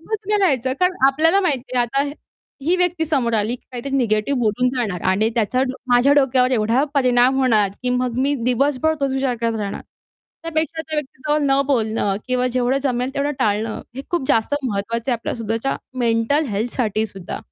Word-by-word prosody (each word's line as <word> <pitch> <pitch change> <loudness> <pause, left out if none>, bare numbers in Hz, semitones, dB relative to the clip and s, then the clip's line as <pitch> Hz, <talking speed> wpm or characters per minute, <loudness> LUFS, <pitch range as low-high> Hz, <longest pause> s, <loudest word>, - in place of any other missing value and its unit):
उभंच 435 +6 -3
नाही 420 - +2
राहायचं 265 -9 +2
कारण 365 0 +3
आपल्याला 325 +7 +3
माहिती 275 -8 -2
आता 245 +3 +1
हे 285 0 -4 0.5
ही 345 - +3
व्यक्ती 355 -2 +1
समोर 270 -7 0
आली, 215 +2 0
की - - -35
काहीतरी 250 +2 -5
निगेटिव्ह 235 +2 +1
बोलून 235 +2 +1
जाणार 210 -9 -2
आणि 210 +4 +2
त्याचा 235 +3 +1
डो 260 -1 -1 0.2
माझ्या 245 +3 +5
डोक्यावर 260 -3 +3
एवढा 235 +3 +2
परिणाम 255 -1 +3
होणार, 225 -6 +3
की 250 - 0
मग 250 -1 -1
मी 285 +2 +2
दिवसभर 275 +5 +1
तोच 275 -1 0
विचार 265 -2 0
करत 230 -1 -1
राहणार. 205 -2 -4 0.6
त्यापेक्षा 320 -1 -2
त्या 315 -1 -5
व्यक्तीजवळ 300 +1 -2
न 270 0 +3
बोलणं 220 -6 0
किंवा 255 0 +1
जेवढं 255 +1 +1
जमेल 250 -1 -1
तेवढं 285 +1 0
टाळणं, 215 +1 0 0.2
हे 270 - -4
खूप 345 -7 -1
जास्त 225 +5 +2
महत्त्वाचं 230 +2 -2
आहे 240 - +2
आपल्या - - -4
सुद्धाच्या 230 +3 -2 0.2
मेंटल 235 +5 +1
हेल्थ 220 +3 -2
साठीसुद्धा. 215 -5 -2
255 Hz, 180 wpm, -20 LUFS, 230-280 Hz, 0.6 s, माझ्या